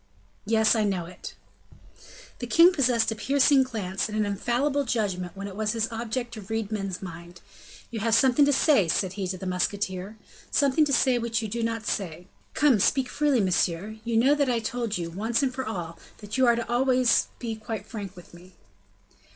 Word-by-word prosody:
"Yes, 220 Hz, 0 st, +3 dB
I 220 Hz, -, +1 dB
know 190 Hz, -4 st, -1 dB
it." 180 Hz, +2 st, -10 dB, 1.0 s
The 245 Hz, -, -5 dB
king 335 Hz, +8 st, +6 dB
possessed 245 Hz, -7 st, +2 dB
a -, -, -3 dB
piercing 275 Hz, +4 st, +3 dB
glance 210 Hz, -6 st, -3 dB
and 215 Hz, -, -4 dB
an 215 Hz, -, +1 dB
infallible 250 Hz, +8 st, 0 dB
judgment 195 Hz, -7 st, -2 dB
when 195 Hz, -, -5 dB
it 195 Hz, -, -9 dB
was 215 Hz, +1 st, -1 dB
his 225 Hz, -1 st, 0 dB
object 235 Hz, +1 st, -4 dB
to 220 Hz, -, -7 dB
read 220 Hz, +1 st, -4 dB
men's 195 Hz, -3 st, -4 dB
minds. 170 Hz, 0 st, -9 dB, 0.5 s
"You 225 Hz, -, -4 dB
have 225 Hz, +1 st, +2 dB
something 260 Hz, +3 st, +4 dB
to 285 Hz, -, +3 dB
say," 275 Hz, -, +3 dB
said 185 Hz, +3 st, 0 dB
he 195 Hz, -2 st, -3 dB
to 185 Hz, +1 st, -4 dB
the 190 Hz, -, -8 dB
musketeer, 190 Hz, +2 st, -2 dB, 0.3 s
"something 280 Hz, +2 st, +3 dB
to 290 Hz, -, -2 dB
say 255 Hz, -1 st, +3 dB
which 230 Hz, 0 st, -2 dB
you -, -, -2 dB
do 230 Hz, +3 st, -3 dB
not 230 Hz, -1 st, -2 dB
say. 175 Hz, -3 st, -3 dB, 0.3 s
Come, 275 Hz, -7 st, +4 dB
speak 255 Hz, +5 st, +2 dB
freely, 285 Hz, -5 st, +1 dB
monsieur; 185 Hz, +2 st, 0 dB
you 230 Hz, -1 st, -1 dB
know 260 Hz, +5 st, +5 dB
that 285 Hz, -2 st, +1 dB
I 240 Hz, -, +1 dB
told 230 Hz, -1 st, -3 dB
you, 170 Hz, -1 st, -5 dB
once 225 Hz, +8 st, -1 dB
and 260 Hz, -2 st, 0 dB
for 260 Hz, -2 st, -4 dB
all, 170 Hz, -6 st, -5 dB, 0.2 s
that 205 Hz, -1 st, -8 dB
you 260 Hz, -1 st, +3 dB
are 235 Hz, -, +5 dB
to 235 Hz, -, -2 dB
be -, -, -19 dB
always 250 Hz, 0 st, +3 dB, 0.3 s
quite 220 Hz, -2 st, -5 dB
frank 205 Hz, -5 st, -7 dB
with 180 Hz, -1 st, -15 dB
me." 180 Hz, +2 st, -15 dB
225 Hz, 200 wpm, -26 LUFS, 195-250 Hz, 1.0 s, king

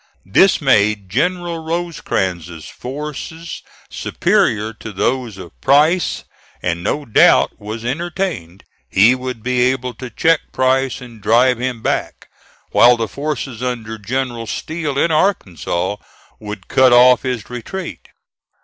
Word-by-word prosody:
This 140 Hz, -, +4 dB
made 105 Hz, -, +2 dB
General 170 Hz, -, -1 dB
Rosecrans's 95 Hz, -, -3 dB
forces 150 Hz, +4 st, -7 dB, 0.3 s
superior 110 Hz, +1 st, 0 dB
to 110 Hz, 0 st, -9 dB
those 120 Hz, +1 st, -1 dB
of 90 Hz, -2 st, -10 dB
Price, 155 Hz, +6 st, +3 dB, 0.4 s
and 85 Hz, -1 st, -1 dB
no 145 Hz, +8 st, -1 dB
doubt 110 Hz, -, +4 dB
was 110 Hz, +2 st, -6 dB
entertained 155 Hz, -, -3 dB, 0.3 s
he 105 Hz, -, +5 dB
would 125 Hz, -3 st, -5 dB
be 125 Hz, 0 st, +1 dB
able 125 Hz, 0 st, 0 dB
to 130 Hz, 0 st, -8 dB
check 160 Hz, +7 st, +1 dB
Price 130 Hz, 0 st, +1 dB
and 120 Hz, -3 st, -12 dB
drive 120 Hz, +3 st, +3 dB
him 125 Hz, -3 st, -3 dB
back; -, -, -2 dB, 0.4 s
while 120 Hz, 0 st, +6 dB
the 115 Hz, -1 st, -1 dB
forces 135 Hz, -1 st, -4 dB
under 115 Hz, -3 st, -4 dB
General 120 Hz, +1 st, -3 dB
Steele, 155 Hz, +2 st, -4 dB
in 165 Hz, +4 st, +2 dB
Arkansas, 100 Hz, -, 0 dB, 0.4 s
would 105 Hz, -3 st, -8 dB
cut 130 Hz, -1 st, +4 dB
off 125 Hz, 0 st, +7 dB
his 125 Hz, -4 st, -3 dB
retreat. 140 Hz, +10 st, -7 dB
125 Hz, 125 wpm, -18 LUFS, 110-145 Hz, 0.4 s, off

